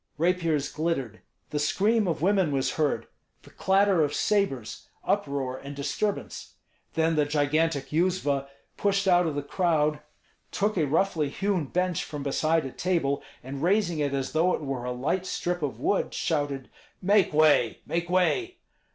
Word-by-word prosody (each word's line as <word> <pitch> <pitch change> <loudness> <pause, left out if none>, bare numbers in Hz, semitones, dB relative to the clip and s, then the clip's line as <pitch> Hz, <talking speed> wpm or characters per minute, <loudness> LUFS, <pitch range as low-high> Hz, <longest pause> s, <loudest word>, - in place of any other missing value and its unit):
Rapiers 165 -3 +1
glittered; 135 -9 -3 0.3
the 150 - -1
scream 210 +8 +2
of 165 -2 -2
women 190 -4 +3
was 135 -2 0
heard, 150 -2 0 0.4
the - - -16
clatter 195 -3 +3
of 145 - -1
sabres, 135 - -1
uproar 135 -2 -1
and 140 +1 -8
disturbance. 150 +9 -3 0.4
Then 160 0 +2
the 150 -1 +3
gigantic 145 0 0
Yuzva 155 -5 +1 0.3
pushed 200 -1 +1
out 175 -2 +4
of 155 - -2
the 145 - -2
crowd, 155 -2 +1 0.5
took 210 +1 0
a 160 -5 +1
roughly 160 -1 +1
hewn 195 +1 -1
bench 180 +3 -1
from 145 -2 -6
beside 155 +2 +1
a 135 - -5
table, 165 -6 0 0.2
and 135 +2 -6
raising 175 -2 +2
it 145 -2 0
as 135 -1 -2
though 170 +3 +2
it - - -7
were 135 -4 -4
a 125 - -2
light 155 +10 -1
strip 175 0 -2
of 145 -3 -3
wood, 200 - 0
shouted, 145 -4 -2 0.3
"Make 200 +1 +3
way! 150 -7 +3
make 170 +1 -2
way!" 350 - +1
160 Hz, 160 wpm, -27 LUFS, 140-185 Hz, 0.5 s, out